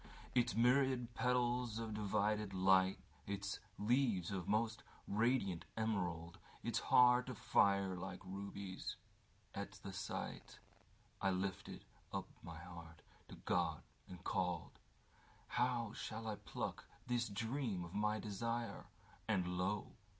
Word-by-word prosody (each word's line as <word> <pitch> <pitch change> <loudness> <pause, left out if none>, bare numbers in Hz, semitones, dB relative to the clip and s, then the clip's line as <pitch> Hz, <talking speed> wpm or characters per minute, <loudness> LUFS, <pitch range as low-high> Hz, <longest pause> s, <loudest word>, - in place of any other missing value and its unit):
Its 120 -1 +3
myriad 125 0 +4
petals 125 -2 +2
of 115 -1 -3
divided 105 -1 +1
light; 95 0 +5 0.3
Its 100 0 -2 0.2
leaves 110 -5 +2
of 95 -3 -2
the - - -6
most 110 +1 +2 0.3
radiant 105 -5 +2
emerald; 90 -6 -1 0.2
Its - - +1
heart 125 0 +6
of 125 - -5
fire 100 -2 +4
like 90 +1 -5
rubies. 100 0 -5 0.6
At 100 0 -4
the 100 - -4
sightI 95 0 -5 0.7
lifted 95 +1 -2 0.3
up - - -2
my 85 -1 -8
heart 85 -1 -10 0.2
to - - -9
God - - 0 0.3
and 90 0 -9
called:How 110 +6 -2
shall 110 0 -5
I 105 -2 -2
pluck - - -4 0.2
this 120 -1 +1
dream 115 -2 -1
of 85 - -10
my 105 +1 +1
desire? 115 +3 -2 0.4
And 95 -5 +2
lo! 95 +3 0
105 Hz, 120 wpm, -40 LUFS, 95-115 Hz, 0.7 s, heart